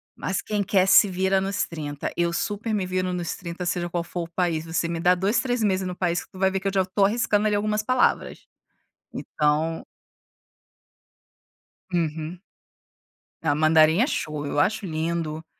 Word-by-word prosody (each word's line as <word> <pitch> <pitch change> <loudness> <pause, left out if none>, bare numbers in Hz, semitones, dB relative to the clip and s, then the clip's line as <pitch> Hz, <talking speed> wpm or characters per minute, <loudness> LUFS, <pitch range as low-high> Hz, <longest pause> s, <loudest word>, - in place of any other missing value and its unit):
mas 190 - -2
quem 210 -1 -1
quer 190 -1 +2
se 195 +1 +7
vira 190 +1 +1
nos 195 +1 -1
trinta. 145 -3 -5
Eu 170 0 +1
super 210 +5 -2
me 200 -3 0
viro 185 0 -1
nos 175 -2 -3
trinta 175 0 -6
seja 175 0 -1
qual 175 0 -2
for 175 +1 -5
o 165 - -10
país. 170 -3 -1
Você 165 +1 -1
me 170 0 -3
dá 180 +2 +4
2, 195 +5 +1
3 245 -2 -1
meses 190 -3 +1
no 180 -1 -4
país 175 -1 -1
que - - -22
tu 185 - -12
vai 190 0 +3
ver 190 0 -2
que 195 - -3
eu - - +1
já 190 -1 +2
tô 185 +2 0
arriscando 215 0 +1
ali 210 - +1
algumas 210 +1 0
palavras. 255 +3 +1 0.7
Então 155 +2 -1 2.1
Uhum. 165 0 -2 1.0
Ah, 155 -3 +2
mandarim 155 +3 +4
é - - +3
show, 155 - -3
eu 145 - -3
acho 205 +8 +1
lindo 160 -1 -3
180 Hz, 180 wpm, -24 LUFS, 165-195 Hz, 2.1 s, se